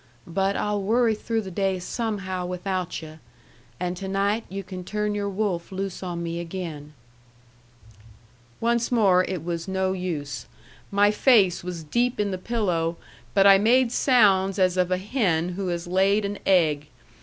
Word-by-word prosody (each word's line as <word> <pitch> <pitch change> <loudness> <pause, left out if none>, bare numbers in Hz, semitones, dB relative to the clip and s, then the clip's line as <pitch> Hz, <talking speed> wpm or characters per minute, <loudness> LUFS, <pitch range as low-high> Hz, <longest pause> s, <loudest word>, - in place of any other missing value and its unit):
"But 195 +3 0
I'll 210 -1 -1
worry 225 +3 +2
through 225 +1 -2
the 190 - -7
day 190 +1 0
somehow 190 -2 -3
without 180 -1 -3
yu'. 155 0 -11 0.6
And 180 0 -2
to 190 - -5
night 200 +3 0
you 195 +1 -5
can 185 -1 -7
turn 210 +2 -2
your 205 -1 -2
wolf 195 -4 -2
loose 195 -1 -4
on 175 -2 -4
me 170 0 -3
again." 165 -4 -6 1.7
Once 235 +1 +1
more 195 -6 +4
it 180 -4 -4
was 170 0 -4
no 190 0 0
use. 155 - -4 0.4
My 205 +1 +4
face 210 -7 +4
was 175 -2 -5
deep 240 +10 0
in 205 -1 0
the 185 - -3
pillow, 180 -7 -1 0.4
but 195 -1 +5
I 195 -1 +8
made 240 +3 +4
sounds 200 -8 +3
as 185 -2 +3
of 180 -1 +1
a 185 - +1
hen 185 -5 0
who 190 +1 -4
has 175 -1 -2
laid 195 +3 +2
an 200 0 -4
egg. 155 -6 +3
190 Hz, 165 wpm, -25 LUFS, 175-205 Hz, 1.7 s, I